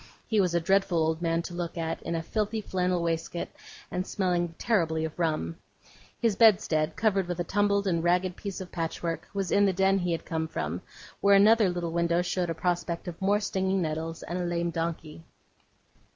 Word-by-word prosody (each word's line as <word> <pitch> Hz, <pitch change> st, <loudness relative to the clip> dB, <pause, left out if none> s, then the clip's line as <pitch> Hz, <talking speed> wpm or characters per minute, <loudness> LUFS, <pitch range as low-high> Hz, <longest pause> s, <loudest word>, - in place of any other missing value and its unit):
He 215 Hz, -2 st, +2 dB
was 180 Hz, -2 st, +1 dB
a -, -, +4 dB
dreadful 190 Hz, +1 st, +2 dB
old 160 Hz, 0 st, +1 dB
man 165 Hz, 0 st, 0 dB
to 175 Hz, -, -7 dB
look 175 Hz, -1 st, -4 dB
at, 165 Hz, -1 st, -2 dB
in 170 Hz, -, -3 dB
a 165 Hz, -, -2 dB
filthy 215 Hz, +5 st, -1 dB
flannel 180 Hz, -3 st, -1 dB
waistcoat, 165 Hz, +1 st, -2 dB, 0.4 s
and 180 Hz, +1 st, -2 dB
smelling 175 Hz, -3 st, 0 dB
terribly 165 Hz, -9 st, +1 dB
of 160 Hz, +2 st, -7 dB
rum. 155 Hz, -, -1 dB, 0.6 s
His 230 Hz, -4 st, +2 dB
bedstead, 185 Hz, -8 st, +4 dB
covered 195 Hz, -3 st, +1 dB
with 175 Hz, -1 st, -3 dB
a -, -, +1 dB
tumbled 200 Hz, +2 st, +1 dB
and 170 Hz, -4 st, +1 dB
ragged 180 Hz, +1 st, +2 dB
piece 200 Hz, -1 st, -6 dB
of 185 Hz, -, -8 dB
patchwork, 165 Hz, 0 st, -3 dB
was 195 Hz, -3 st, -1 dB
in 205 Hz, -, +5 dB
the 195 Hz, -, +2 dB
den 195 Hz, +1 st, +3 dB
he 180 Hz, -1 st, -1 dB
had 165 Hz, -, -2 dB
come 160 Hz, 0 st, -2 dB
from, 80 Hz, -, -3 dB, 0.4 s
where 200 Hz, 0 st, +5 dB
another 210 Hz, 0 st, +6 dB
little 175 Hz, -2 st, -3 dB
window 170 Hz, +1 st, +1 dB
showed 180 Hz, -1 st, -1 dB
a 165 Hz, -, -2 dB
prospect 175 Hz, 0 st, -2 dB
of 175 Hz, +2 st, -7 dB
more 200 Hz, +2 st, +3 dB
stinging 190 Hz, -1 st, 0 dB
nettles, 160 Hz, +1 st, -3 dB
and 175 Hz, +1 st, -4 dB
a -, -, -1 dB
lame 170 Hz, 0 st, -1 dB
donkey. 165 Hz, -1 st, -4 dB
175 Hz, 195 wpm, -28 LUFS, 165-195 Hz, 0.6 s, another